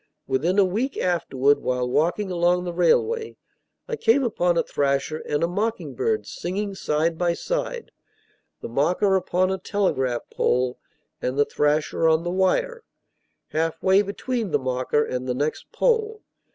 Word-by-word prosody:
Within 155 +9 0
a 200 - +6
week 230 +9 -2
afterward, 145 -6 +1
while 125 -1 -1
walking 175 +9 0
along 175 0 +2
the 175 -1 -4
railway, 440 - +1 0.5
I 485 - -2
came 270 - +3
upon 180 -7 +1
a - - +3
thrasher 140 +2 -1
and 145 +2 0
a - - +3
mocking 215 +6 -2
bird 435 +1 -1
singing 200 +3 -4
side 160 -2 -1
by 175 -1 +2
side; - - -3 0.7
the - - -5
mocker 180 - +2
upon 185 0 +1
a 190 - -2
telegraph 135 - -1
pole, 125 0 0 0.4
and 130 +2 -2
the 145 - +4
thrasher 150 +3 +1
on 160 +1 +2
the 175 - -2
wire, 470 - 0 0.7
halfway 165 +5 +2
between 215 +2 -3
the - - +2
mocker 130 +3 0
and 125 0 -4
the 125 - -1
next 145 +4 -3
pole. 445 -2 0
175 Hz, 150 wpm, -24 LUFS, 150-210 Hz, 0.7 s, a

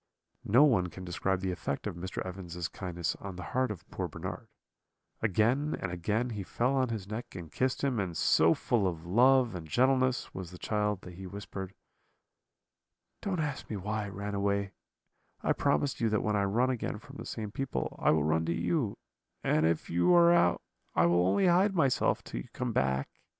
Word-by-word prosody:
"No 125 +8 +6
one 110 -12 +4
can 90 +1 -9
describe 90 +2 -1
the 95 -1 -1
effect 70 -5 -3
of 105 -4 -3
Mr. 95 +3 -5
Evans's 90 -2 -5
kindness 85 -3 -3
on 100 -2 -7
the 90 - -7
heart 130 0 +2
of 105 -5 -7
poor - - -3
Bernard; - - -6 0.7
again 115 - +2
and 95 - -3
again 105 +8 -1
he 105 -2 -4
fell 120 +7 0
on 130 -2 +2
his 110 -5 -4
neck 110 +1 -6
and 85 -4 -8
kissed 130 - -1
him; 130 -5 +1
and 90 -4 -2
so 80 +1 +4
full 110 -6 +1
of 85 -2 -4
love 125 +5 +4
and 85 -3 -6
gentleness 130 - +2
was 95 -2 -6
the 90 - -10
child 105 0 -1
that 90 - -10
he 95 +2 -8
whispered: 95 -1 -7 1.5
"'Don't 185 -5 -1
ask 145 -3 -4
me 110 - -3
why 105 +2 -2
I - - -6
ran 100 +1 -5
away; 100 0 0 0.7
I - - +3
promise 140 -2 0
you 115 - +3
that 110 -1 +1
when 105 -1 +1
I 100 -1 +2
run 120 +6 +2
again 120 -3 -3
from 140 +6 -12
the - - -7
same 110 -3 -5
people, 135 +3 -3
I - - +3
will 75 -1 +4
run 80 +2 +2
to 85 - 0
you; 125 - 0 0.5
and 75 +1 +3
if 85 -1 0
you 90 - +4
are 170 0 +7
out, 90 - +3 0.3
I - - +5
will 85 +1 +3
only 100 - +3
hide 185 +3 +4
myself 140 -7 +2
till - - -5
you - - -11
come - - -2
back.' 65 +1 0
100 Hz, 200 wpm, -30 LUFS, 90-125 Hz, 1.5 s, are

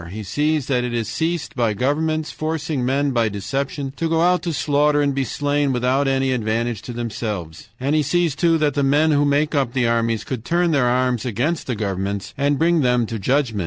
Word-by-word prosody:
He 105 +4 -6
sees 150 +7 0
that 125 -3 0
it 120 -1 -3
is 110 -2 -3
caused 165 0 -1
by 115 -4 +1
governments 155 +6 0
forcing 155 -3 -3
men 140 +3 +1
by 115 -3 +1
deception 135 +6 -3
to 165 - -1
go 165 0 +2
out 180 +1 +3
to 170 - -2
slaughter 145 -1 +2
and 145 -1 +1
be 135 0 0
slain 145 +1 0
without 130 +3 +1
any 135 0 +1
advantage 115 -1 -1
to - - -7
themselves. 105 -8 -5
And 135 +3 0
he 155 - +3
sees, 165 +2 +1
too, 165 +2 +2
that 150 -2 +1
the 145 - 0
men 145 +3 +3
who 145 -1 +3
make 145 +2 +1
up 135 -5 0
the 125 -3 +1
armies 115 -2 0
could 120 -1 -5
turn 175 +4 +1
their 135 -5 +2
arms 125 -1 +1
against 130 +7 -2
the 125 - -1
governments 100 -1 -3
and 140 +1 +1
bring 165 +1 +3
them 125 -2 +2
to 110 0 -5
judgment. 125 0 0
135 Hz, 215 wpm, -21 LUFS, 120-150 Hz, -, out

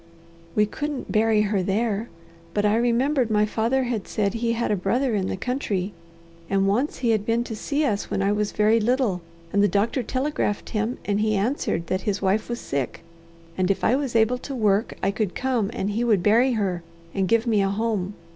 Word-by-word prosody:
"We 210 - +4
couldn't 290 +5 -4
bury 215 0 +3
her 205 -2 0
there. 210 +3 -1 0.5
But 205 0 +2
I 210 +1 +3
remembered 245 +2 +2
my 210 -1 +3
father 230 +5 0
had 240 -5 -3
said 200 -2 0
he 230 0 0
had 235 -1 -1
a - - +3
brother 235 +7 0
in 195 -3 0
the - - -3
country, 205 -5 -2 0.6
and 195 0 +2
once 245 +9 0
he 240 -3 +1
had 215 -2 +1
been 230 +2 +1
to 225 - -6
see 290 +7 -1
us 205 -6 -1
when 195 - 0
I 200 - +2
was 210 0 0
very 215 +2 +3
little, 230 -5 +1 0.3
and 200 - +4
the 205 - +5
doctor 205 +7 +1
telegraphed 255 -3 -2
him, 220 +3 -1
and 205 0 0
he 215 0 +2
answered 205 - -1
that 185 +3 -1
his 205 0 -1
wife 200 +4 0
was 240 0 -3
sick, 135 +1 -3 0.5
and 185 0 0
if 195 - 0
I 245 - +4
was 270 -4 -2
able 230 +3 +3
to 275 +1 -6
work 210 -2 +1
I 195 - +2
could 205 -3 -2
come, 250 -6 0
and 210 -4 -2
he 225 +4 0
would 215 -7 +2
bury 235 +6 +4
her, 190 -6 -1 0.3
and 190 -1 0
give 230 +4 +2
me 220 -4 +2
a 195 - +1
home. 205 -2 -1
215 Hz, 210 wpm, -24 LUFS, 200-240 Hz, 0.6 s, the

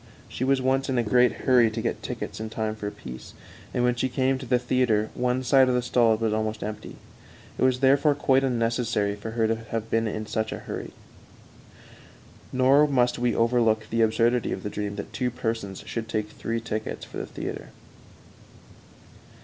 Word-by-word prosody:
She - - -5
was 135 0 +2
once 135 +1 +1
in 130 - 0
a 120 - +2
great 125 +3 +4
hurry 125 -4 +5
to 110 +1 -5
get - - -2
tickets - - -5
in 110 0 -4
time 110 -1 -3
for 105 -1 -5
a - - -3
piece, 65 -7 -10 0.4
and 120 - 0
when 125 0 +3
she 125 +2 -1
came 130 +1 +1
to 130 - -8
the 125 - +3
theater 125 -3 +1
one 125 +1 0
side 130 0 +5
of 125 - +2
the 125 - +2
stalls 115 -3 +3
was 110 -1 +1
almost 110 0 -2
empty. 105 +1 -6 0.6
It - - -3
was 130 0 +2
therefore 140 +2 +4
quite 135 -1 +2
unnecessary 115 -4 0
for 105 +2 -7
her 115 - +3
to 115 - +1
have 115 0 -5
been 115 0 +2
in 110 0 -4
such 110 0 -2
a - - -4
hurry. - - -6 1.6
Nor 135 +3 +5
must 125 -4 +1
we 120 -1 +1
overlook 115 -2 +2
the 115 0 +1
absurdity 115 +2 +2
of 95 - -4
the 105 - -4
dream 105 -1 -4
that 100 - -7
two 125 -1 0
persons 115 -5 -4
should 115 -1 -5
take 105 -2 -2
three 115 0 -3
tickets 110 -1 -4
for - - -9
the - - -5
theater. - - -6
115 Hz, 195 wpm, -26 LUFS, 110-125 Hz, 1.6 s, hurry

